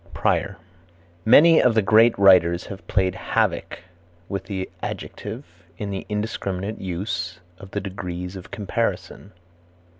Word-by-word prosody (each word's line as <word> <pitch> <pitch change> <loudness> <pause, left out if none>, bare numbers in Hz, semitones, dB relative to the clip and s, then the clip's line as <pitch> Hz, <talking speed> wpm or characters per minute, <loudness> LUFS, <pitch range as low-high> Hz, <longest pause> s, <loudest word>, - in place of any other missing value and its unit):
Prior. - - 0 0.7
Many 160 +8 +7
of 125 -3 +3
the 110 - +3
great 110 +3 +5
writers 90 -3 +5
have 100 -1 -10
played 95 -2 +1
havoc - - -1 0.5
with 100 - -4
the 95 -2 -4
adjective 110 +7 -6 0.3
in 100 -1 -4
the 95 - -5
indiscriminate 105 -1 -3
use 90 -1 -4 0.2
of 95 - -11
the 100 - -3
degrees 90 -1 -6
of 95 0 -10
comparison. 100 -2 -3
100 Hz, 125 wpm, -23 LUFS, 90-105 Hz, 0.7 s, Many